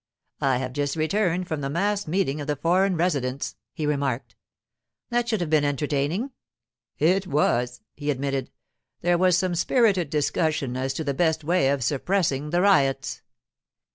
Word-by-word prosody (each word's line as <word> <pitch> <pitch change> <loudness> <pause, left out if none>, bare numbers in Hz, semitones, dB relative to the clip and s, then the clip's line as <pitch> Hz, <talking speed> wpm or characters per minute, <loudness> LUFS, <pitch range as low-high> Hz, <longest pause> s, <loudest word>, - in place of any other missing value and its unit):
'I 135 -2 +2
have 130 0 -4
just 145 +1 -1
returned 180 +2 0
from 155 -2 -3
the 135 - -2
mass 200 +5 0
meeting 155 -4 0
of 145 - -6
the 150 - 0
foreign 180 +5 +2
residents,' 140 -6 -1 0.2
he 155 - -4
remarked. 135 -5 -1 0.8
'That 240 0 +1
should 220 -5 0
have 170 - -2
been 155 -2 +4
entertaining.' 145 - -1 0.7
'It 185 +5 +2
was,' 125 -5 +1
he 145 0 -5
admitted. 135 -1 -1 0.5
'There 175 0 +2
was 180 -1 +4
some 180 0 0
spirited 190 - +2
discussion 150 -3 0
as 130 +1 -2
to 160 - -2
the 140 -2 -1
best 160 +1 +1
way 165 -3 +2
of 140 -2 0
suppressing 150 - 0
the 175 +3 +1
riots. 135 -9 +2
155 Hz, 160 wpm, -25 LUFS, 140-180 Hz, 0.8 s, been